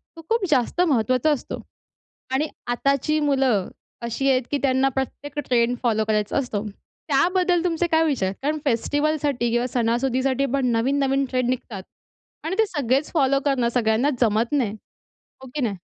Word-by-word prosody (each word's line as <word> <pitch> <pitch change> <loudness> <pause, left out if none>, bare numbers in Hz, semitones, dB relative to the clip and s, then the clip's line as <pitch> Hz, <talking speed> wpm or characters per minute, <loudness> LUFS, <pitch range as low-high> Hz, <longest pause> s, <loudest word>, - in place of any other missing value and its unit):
तो 330 - -10
खूप 455 -3 +1
जास्त 275 +5 +1
महत्त्वाचा 255 -2 +2
असतो 285 - -3 0.7
आणि 290 +4 +1 0.2
आताची 275 +5 +1
मुलं 270 -9 +1 0.3
अशी 235 +4 -1
आहेत 255 -1 +3
की 290 - +1
त्यांना 265 0 +2
प्रत्येक 285 +2 -4
ट्रेंड 240 0 +2
फॉलो 220 -3 +2
करायचा 210 +1 0
असतो. 220 -6 -2 0.4
त्याबद्दल 350 +4 +2
तुमचे 345 -1 0
काय 320 -1 +3
विचार? 215 -11 0
कारण 300 +3 0
फेस्टिव्हलसाठी 285 0 0
किंवा 240 +1 +1
सणासुदीसाठी 255 +3 +1
पण 275 -2 +1
नवीन-नवीन 270 +3 +1
ट्रेंड 255 -1 0
निघतात 235 -6 -4 0.6
आणि 345 +4 -1
ते 445 - +5
सगळेच 280 - -1
फॉलो 275 -4 +3
करणं 260 -4 +2
सगळ्यांना 235 +2 +2
जमत 225 0 +2
नाही. 260 -8 +1 0.7
हो 265 - -11
की 300 - -2
नाही? 220 -6 -1
265 Hz, 150 wpm, -23 LUFS, 240-290 Hz, 0.7 s, ते